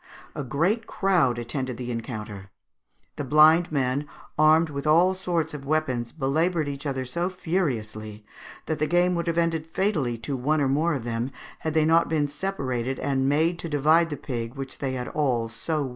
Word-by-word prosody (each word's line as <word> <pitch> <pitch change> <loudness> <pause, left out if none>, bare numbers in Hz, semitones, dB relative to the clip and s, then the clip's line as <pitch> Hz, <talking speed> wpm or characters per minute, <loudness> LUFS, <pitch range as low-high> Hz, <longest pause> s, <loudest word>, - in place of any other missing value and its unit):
A 145 - -4
great 170 - 0
crowd 175 -11 +2
attended 125 +1 -3
the 125 -1 -4
encounter. 105 -4 -6 0.7
The - - -2
blind 155 +5 +5
men, 140 0 0 0.3
armed 155 +1 +4
with 140 +1 -4
all 170 +5 +5
sorts 170 -4 -2
of 145 -2 -7
weapons, 135 -5 -1
belaboured 160 +3 0
each 140 +1 -4
other 135 -2 -2
so 170 +8 -1
furiously 110 - -3 0.4
that 155 - -2
the 155 - +1
game 175 +2 +3
would 170 -1 -2
have 170 0 0
ended 165 -2 0
fatally 160 - 0
to 140 +2 -2
one 150 +5 +1
or 140 - +2
more 150 +4 +1
of 130 - -4
them 120 +1 -2 0.3
had 160 0 -3
they 155 -1 +4
not 165 +1 +4
been 155 -2 +1
separated 135 -6 -3
and 135 -1 0
made 160 +4 +2
to 165 - -5
divide 155 +3 +3
the 145 - -4
pig 120 -3 -5
which 135 -1 -7
they 135 -2 -2
had 125 -1 -4
all 125 -7 0
so 150 +7 -2
well - - 0
earned. 135 - -4
145 Hz, 190 wpm, -25 LUFS, 130-165 Hz, 0.7 s, blind